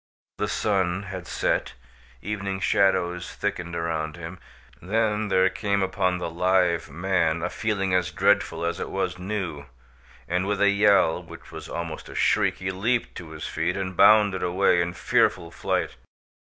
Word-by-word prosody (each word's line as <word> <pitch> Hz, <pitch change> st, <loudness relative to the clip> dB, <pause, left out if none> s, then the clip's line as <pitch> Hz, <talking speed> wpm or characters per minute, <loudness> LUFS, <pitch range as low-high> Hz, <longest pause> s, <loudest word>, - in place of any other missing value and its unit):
The -, -, 0 dB
sun 95 Hz, -2 st, 0 dB
had 95 Hz, -3 st, -7 dB
set, -, -, -1 dB, 0.5 s
evening 100 Hz, -2 st, -3 dB
shadows 95 Hz, -3 st, +1 dB
thickened 90 Hz, -4 st, -3 dB
around 80 Hz, -2 st, -2 dB
him. 85 Hz, +1 st, -8 dB, 0.4 s
Then 110 Hz, +2 st, 0 dB
there 95 Hz, -1 st, +3 dB
came 100 Hz, -2 st, 0 dB
upon 95 Hz, -1 st, 0 dB
the 90 Hz, -, -3 dB
live 90 Hz, -1 st, +1 dB
man 85 Hz, 0 st, 0 dB
a 90 Hz, -, -2 dB
feeling 100 Hz, -4 st, -1 dB
as 90 Hz, -1 st, +2 dB
dreadful 85 Hz, -1 st, +1 dB
as 85 Hz, -, -2 dB
it -, -, -4 dB
was -, -, -2 dB
new, 90 Hz, -7 st, -4 dB, 0.6 s
and, 90 Hz, +2 st, 0 dB
with 100 Hz, -1 st, -1 dB
a 100 Hz, -, +5 dB
yell, 100 Hz, -4 st, +4 dB
which 85 Hz, -1 st, -13 dB
was -, -, -9 dB
almost 85 Hz, -2 st, -5 dB
a -, -, -10 dB
shriek, -, -, +2 dB
he 95 Hz, 0 st, -3 dB
leaped 115 Hz, +6 st, -1 dB
to 85 Hz, -3 st, -9 dB
his 80 Hz, -1 st, -7 dB
feet 85 Hz, +4 st, -2 dB
and 95 Hz, -1 st, -4 dB
bounded 100 Hz, 0 st, +5 dB
away 90 Hz, 0 st, +2 dB
in 85 Hz, 0 st, -2 dB
fearful 85 Hz, -1 st, +1 dB
flight. -, -, -2 dB
90 Hz, 160 wpm, -25 LUFS, 85-100 Hz, 0.6 s, a